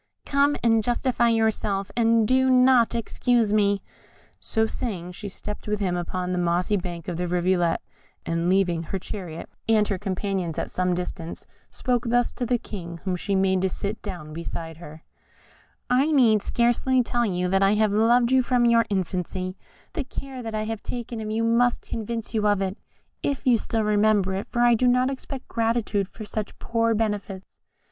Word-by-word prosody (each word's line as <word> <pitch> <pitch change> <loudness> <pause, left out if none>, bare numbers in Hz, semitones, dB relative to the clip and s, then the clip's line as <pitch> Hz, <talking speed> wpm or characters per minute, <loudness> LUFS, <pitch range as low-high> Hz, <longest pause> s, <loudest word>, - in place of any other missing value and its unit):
"Come 285 +1 +2
and 225 -2 +4
justify 240 0 +1
yourself, 215 -3 0
and 230 -2 +3
do 260 +1 +3
not 255 -2 +5
accuse 230 -1 +1
me." 200 -1 +2 0.6
So 220 -1 0
saying, 190 -6 -4
she 200 +3 -7
stepped 210 +3 -7
with 210 0 -1
him 185 -3 0
upon 180 +1 -3
the 180 - 0
mossy 175 +3 +1
bank 175 -4 -5
of 175 -3 -3
the 180 0 -2
rivulet, 175 -1 +1 0.4
and 165 +1 0
leaving 180 -3 +2
her 180 +4 -4
chariot 180 -3 -7 0.2
and 215 -2 +4
her 195 -3 -1
companions 190 -4 -2
at - - -3
some 180 -1 0
distance, 175 -2 -6 0.2
spoke 245 -2 -1
thus 245 +1 +2
to 245 - -4
the 245 +1 +2
King, 170 -7 -8
whom 185 -1 -1
she 195 +3 -2
made 190 -1 +2
to 190 - +1
sit 205 +3 -4
down 175 -7 -7
beside 165 0 -6
her: 160 -2 -11 0.8
"I 265 +5 +3
need 230 -8 +5
scarcely 240 +3 +2
tell 240 0 0
you 180 -2 -1
that 195 +1 +2
I 195 +2 +4
have 215 -1 +2
loved 235 +3 +4
you 260 0 +5
from 245 -1 +2
your 230 -1 +4
infancy; 185 -1 -2 0.4
the 310 - -2
care 265 0 -7
that 225 -2 -5
I 215 - -1
have 220 -1 -4
taken 240 -2 -5
of 215 - -4
you 220 +1 0
must 235 +1 +2
convince 225 0 -5
you 215 -1 +1
of 205 -1 +3
it, 190 0 -2 0.5
if 280 -1 -2
you 245 -3 +4
still 225 0 -1
remember 210 -2 +2
it, 195 +1 -3
for 240 - +1
I 240 0 +6
do 250 +2 +2
not 250 +2 +3
expect 270 0 -7
gratitude 225 -3 0
for 215 - -9
such 210 0 -5
poor 230 -1 0
benefits. 205 -3 -3
210 Hz, 185 wpm, -25 LUFS, 185-235 Hz, 0.8 s, I